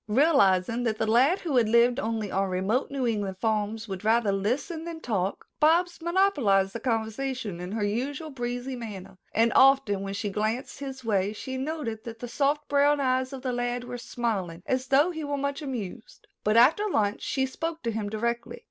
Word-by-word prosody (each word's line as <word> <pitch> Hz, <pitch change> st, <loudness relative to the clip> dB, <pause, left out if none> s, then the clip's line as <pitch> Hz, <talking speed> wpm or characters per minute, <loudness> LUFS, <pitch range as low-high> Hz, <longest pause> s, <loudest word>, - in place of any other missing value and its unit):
Realizing 230 Hz, -, +3 dB
that 220 Hz, -2 st, 0 dB
the 220 Hz, -, 0 dB
lad 255 Hz, -, +3 dB
who 305 Hz, -7 st, 0 dB
had 225 Hz, -3 st, +3 dB
lived 240 Hz, +3 st, +4 dB
only 220 Hz, -5 st, -2 dB
on 195 Hz, 0 st, 0 dB
remote 190 Hz, +8 st, 0 dB
New 275 Hz, -3 st, -2 dB
England 205 Hz, -5 st, -1 dB
farms 220 Hz, +1 st, -1 dB
would 190 Hz, -1 st, -6 dB
rather 220 Hz, -1 st, +3 dB
listen 250 Hz, -, -2 dB
than 335 Hz, -1 st, -6 dB
talk, 200 Hz, -, -2 dB
Bobs 340 Hz, +3 st, +3 dB
monopolized 290 Hz, -, +2 dB
the 230 Hz, -, -4 dB
conversation 225 Hz, -3 st, -2 dB
in 180 Hz, +2 st, -5 dB
her 220 Hz, -1 st, -1 dB
usual 265 Hz, +9 st, -3 dB
breezy 245 Hz, 0 st, -4 dB
manner, 200 Hz, -6 st, -8 dB
and 230 Hz, +1 st, +2 dB
often 265 Hz, -7 st, +5 dB
when 195 Hz, 0 st, -4 dB
she 205 Hz, +1 st, -2 dB
glanced 215 Hz, +7 st, -2 dB
his 265 Hz, -3 st, -7 dB
way 200 Hz, -2 st, +1 dB
she 260 Hz, +4 st, -6 dB
noted 260 Hz, -5 st, -4 dB
that 230 Hz, -1 st, -7 dB
the 245 Hz, -, -6 dB
soft 290 Hz, +4 st, 0 dB
brown 285 Hz, +1 st, +3 dB
eyes 260 Hz, -1 st, +1 dB
of 265 Hz, -2 st, -8 dB
the 255 Hz, -2 st, -1 dB
lad 245 Hz, 0 st, -2 dB
were 245 Hz, 0 st, -6 dB
smiling 195 Hz, -9 st, -3 dB
as 260 Hz, 0 st, -1 dB
though 285 Hz, +7 st, +4 dB
he 320 Hz, -2 st, -5 dB
were 285 Hz, -1 st, -2 dB
much 280 Hz, +1 st, -2 dB
amused. 245 Hz, -6 st, -6 dB, 0.2 s
But 215 Hz, +2 st, +2 dB
after 320 Hz, -, +5 dB
lunch 205 Hz, -, 0 dB
she 265 Hz, -1 st, 0 dB
spoke 325 Hz, +5 st, -5 dB
to 230 Hz, -, -1 dB
him 215 Hz, -2 st, -3 dB
directly. 235 Hz, +2 st, -3 dB
240 Hz, 195 wpm, -27 LUFS, 215-275 Hz, 0.2 s, often